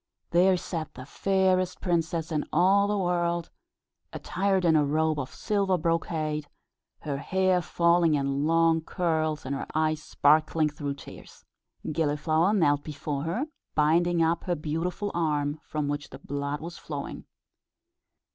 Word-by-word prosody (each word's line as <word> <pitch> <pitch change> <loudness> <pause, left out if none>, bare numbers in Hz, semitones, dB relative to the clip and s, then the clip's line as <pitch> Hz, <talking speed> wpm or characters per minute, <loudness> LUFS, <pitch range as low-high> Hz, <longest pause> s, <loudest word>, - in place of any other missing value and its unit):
There 180 +2 +4
sat 165 -3 -5
the 130 - -9
fairest 185 +2 +1
princess 170 -2 -1
in 150 -2 0
all 195 +4 +4
the 205 0 0
world, 175 -2 0 0.6
attired 190 -1 0
in 165 -2 +4
a 150 - +4
robe 155 +1 +1
of 130 - -4
silver 200 -4 0
brocade, 155 -2 -1 0.5
her 145 -2 -3
hair 185 +4 +1
falling 170 -2 +3
in 140 +1 0
long 165 0 +3
curls, 155 -3 -1
and 135 - -2
her 140 - -4
eyes 155 0 +1
sparkling 155 +1 +2
through 145 -1 -4
tears. - - -13 0.5
Gilliflower 155 +3 +1
knelt 145 -8 +2
before 145 -1 -4
her, 215 - -1 0.3
binding 165 +3 +3
up 165 +1 0
her 175 - 0
beautiful 165 +6 -3
arm, 150 -3 0
from 150 -1 -3
which 145 0 -3
the - - -10
blood 140 +1 -4
was 170 +1 -7
flowing. 145 -3 -6
160 Hz, 140 wpm, -27 LUFS, 150-175 Hz, 0.6 s, There